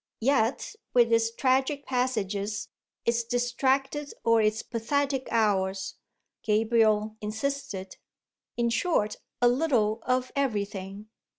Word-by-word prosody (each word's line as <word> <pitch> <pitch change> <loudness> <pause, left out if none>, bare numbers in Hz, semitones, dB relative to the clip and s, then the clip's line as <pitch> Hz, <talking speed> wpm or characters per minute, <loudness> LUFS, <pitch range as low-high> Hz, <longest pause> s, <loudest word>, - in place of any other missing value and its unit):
Yet 255 -1 +1 0.2
with 235 -1 +5
its 225 0 +3
tragic 265 +4 +1
passages, 210 -5 -1 0.4
its 235 0 +2
distracted 265 +4 0
or 230 -1 +4
its 215 0 +1
pathetic 270 +3 -1
hours," 195 -3 0 0.4
Gabriel 215 0 +2
insisted. 220 -3 -4 0.6
"In 235 -1 +1
short, 235 -4 +1 0.3
a - - +7
little 240 -5 +2
of 255 +1 0
everything." 205 -5 -3
230 Hz, 100 wpm, -27 LUFS, 215-260 Hz, 0.6 s, a